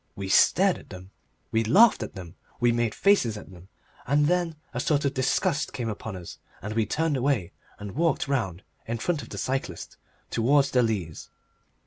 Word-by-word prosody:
We 95 -1 -5
stared 190 - +4
at - - -17
them, 95 0 -11 0.4
we 110 0 +2
laughed 200 - +5
at 110 - -6
them, 90 -3 -9 0.3
we 120 -1 +3
made 120 -1 0
faces 160 - +3
at 105 - -11
them, 90 0 -14 0.4
and 145 +3 +3
then 175 0 +1 0.2
a 125 - -3
sort 145 +2 +1
of 140 - +1
disgust 135 +3 0
of - - -21
them - - -6
came 120 -3 -2
upon 105 -1 -6
us, 90 -2 -9 0.2
and 105 +3 -5
we 110 -2 0
turned 160 +3 0
away 125 -9 0 0.3
and 105 -1 -7
walked 160 - 0
round 105 -10 -2 0.2
in 115 +1 -2
front 160 +5 -1
of 115 - -11
the - - -7
cyclist 130 -10 -4 0.3
towards 140 +4 +3
the 125 - +4
Leas. 100 -9 -3
120 Hz, 195 wpm, -26 LUFS, 105-145 Hz, 0.4 s, laughed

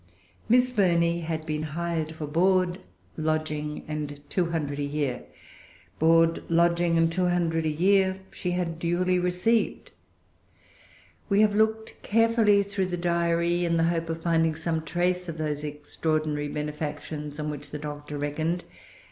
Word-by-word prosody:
Miss 250 +2 +4
Burney 170 -6 +2
had 160 -1 -4
been 155 -1 -2
hired 160 0 -3
for 155 - -5
board, 180 +3 +2 0.4
lodging, 155 -1 -2
and 150 -1 -4
two 180 -3 +1
hundred 150 -4 -2
a - - 0
year. 140 -3 -2 0.7
Board, 165 +1 +4
lodging, 170 0 +3
and 165 0 +3
two 180 +1 +1
hundred 165 -2 +1
a - - +1
year, 190 +3 +3
she 180 - -4
had 175 -2 -2
duly 180 +2 +1
received. 180 +6 0 1.4
We 200 +1 +4
have 210 -1 +4
looked 220 +1 0
carefully 225 -2 +3
through 200 -1 -2
the 180 -1 -3
Diary, 170 0 +1
in 170 -1 +1
the 165 - +3
hope 165 0 -3
of 165 0 -4
finding 165 -2 +2
some 160 0 -2
trace 180 +2 -1
of 165 - -5
those 150 -1 -2
extraordinary 150 0 -2
benefactions 150 0 -5
on 150 0 -2
which 145 -1 -8
the 150 - -5
Doctor 145 0 -6
reckoned. 155 +4 -2
165 Hz, 150 wpm, -26 LUFS, 150-180 Hz, 1.4 s, Miss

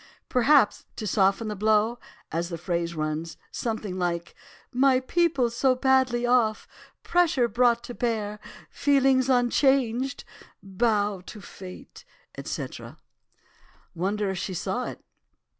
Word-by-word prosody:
"'Perhaps 255 -1 +3
to 215 - -5
soften 195 +2 +2
the 210 - -3
blow, 215 +3 +2 0.3
as 170 +2 -2
the 170 - -4
phrase 170 0 -2
runs, 155 +1 -3
something 215 -5 -3
like 170 -1 -2 0.4
"my 260 +1 +4
people 300 -1 +1
so 255 +2 +1
badly 255 -2 +2
off, 240 -3 +2 0.4
pressure 330 -8 +2
brought 235 +1 +2
to 245 - -7
bear—feelings 250 +4 0
unchanged—bow 240 -5 0
to 215 - -9
Fate, 185 -1 -11 0.3
etc."' - - -6 1.0
"'Wonder 195 +3 -1
if 190 - -4
she 185 - -4
saw 195 +7 -2
it? - - -8
225 Hz, 110 wpm, -26 LUFS, 190-255 Hz, 1.0 s, my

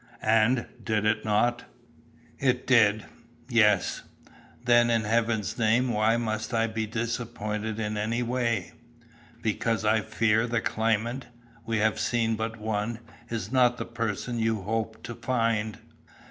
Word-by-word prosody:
"And, 115 +3 +3 0.2
did 105 -1 0
it 110 0 +1
not?" 115 +3 +1 0.7
"It 125 -2 +1
did, 110 -4 +4 0.4
yes." 105 -6 +3 0.6
"Then, 120 -1 +5
in 115 -2 +2
heaven's 110 0 0
name 115 +3 +3
why 110 +2 +3
must 110 0 -2
I 115 0 +3
be 110 -1 -3
disappointed 110 -1 -3
in 105 -1 -2
any 115 +3 -1
way?" 115 -5 -1 0.7
"Because 110 0 0
I 110 +1 +3
fear 110 +3 +1
the 120 0 0
claimant 115 +4 -1 0.4
we 115 -1 0
have 110 0 +1
seen 115 -2 +1
but 110 +1 -4
one 110 +1 -2 0.3
is 110 -2 -4
not 125 -2 +4
the - - -4
person 115 0 -3
you 110 -3 0
hoped 110 +2 -3
to 120 - -6
find." 115 -3 -1
115 Hz, 135 wpm, -27 LUFS, 110-120 Hz, 0.7 s, Then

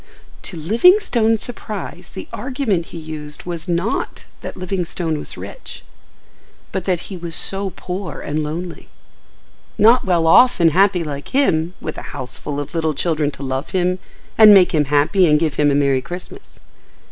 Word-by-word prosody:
To 180 - -5
Livingstone's 225 - +3
surprise 220 -3 -6
the - - -8
argument 240 -11 -2
he - - -9
used 155 -2 -8
was 170 0 -6
not 175 +6 -2 0.2
that - - -7
Livingstone 175 -3 -2
was - - -7
rich, - - -9 0.9
but 190 -2 -3
that 180 -3 0
he 190 - -8
was 170 -1 -5
so 195 0 -1
poor 180 -4 -5
and 150 +1 -2
lonely; 165 +3 -6 0.9
not 235 +4 +5
well 175 -3 +1
off 245 +9 +6
and 165 -2 +5
happy 190 0 +3
like 145 -2 -6
him, 180 - +1
with 155 - -6
a - - -9
house 130 -1 -6
full 145 -1 -4
of 145 - -6
little 160 -2 -1
children 155 0 0
to 140 - -9
love 130 +2 -3
him 180 +1 +1 0.4
and 215 -2 +10
make 185 -2 +6
him 150 -2 +2
happy 150 +7 +3
and 150 -1 +4
give 155 -2 0
him 145 +3 +2
a 140 - +2
merry 140 -2 +2
Christmas. 180 - -10
170 Hz, 170 wpm, -19 LUFS, 150-195 Hz, 0.9 s, and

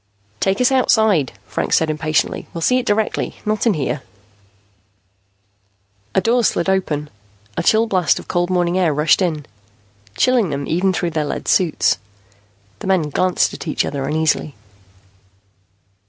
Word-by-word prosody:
"Take 195 +1 0
us 250 +1 +3
outside," 220 - +3
Franks - - 0
said 160 -1 +1
impatiently. 155 0 -1
"We'll 165 - -4
see 255 +6 +3
it 250 - -6
directly, 210 +1 0
not 215 +2 0
in 215 - +3
here." 145 -1 -2 2.1
A 190 - +4
door 240 +3 +2
slid 170 - +1
open. 165 -6 0 0.5
A - - -1
chill 220 +1 +3
blast 185 -7 +1
of - - -8
cold 175 0 0
morning 180 0 +1
air 165 -5 +2
rushed 150 +5 +3
in, 155 -6 -1 0.7
chilling 245 -7 +3
them 140 -1 -3
even 185 +4 +1
through 175 -1 -2
their 155 -1 -1
lead - - -5
suits. 165 - +2 0.8
The - - -7
men 175 -6 +1
glanced 185 +4 +1
at - - -8
each 155 - 0
other 135 -2 -3
uneasily. 155 -1 0
175 Hz, 150 wpm, -19 LUFS, 155-205 Hz, 2.1 s, A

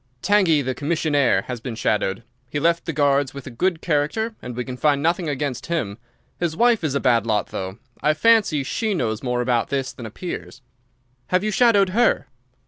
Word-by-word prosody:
"Tangey, 185 -8 +3
the 130 0 -2
commissionnaire, 145 -1 +1
has 125 -3 -6
been 120 -2 -5
shadowed. 105 -1 -1 0.3
He 145 - -2
left 170 +2 +1
the - - 0
Guards 140 -2 +1
with 140 - -8
a 130 - -7
good 170 +7 -1
character 170 +9 0
and 125 -1 -7
we 125 0 -3
can 130 - -6
find 145 +1 +1
nothing 170 0 +1
against 140 -3 -3
him. 125 -12 -2 0.4
His 165 -2 -2
wife 235 -5 +3
is 145 -3 -1
a - - +2
bad 115 -4 +2
lot, 105 -2 0
though. 95 +1 -5 0.2
I 150 0 +2
fancy 205 -7 +3
she 215 - -1
knows 110 -8 -1
more 125 -1 -1
about 120 -2 0
this 135 -2 -2
than 120 - -8
appears." 130 - -7 0.6
"Have 180 +1 +1
you 215 - 0
shadowed 205 -4 +4
her?" 230 +5 +2
145 Hz, 195 wpm, -22 LUFS, 125-175 Hz, 0.6 s, shadowed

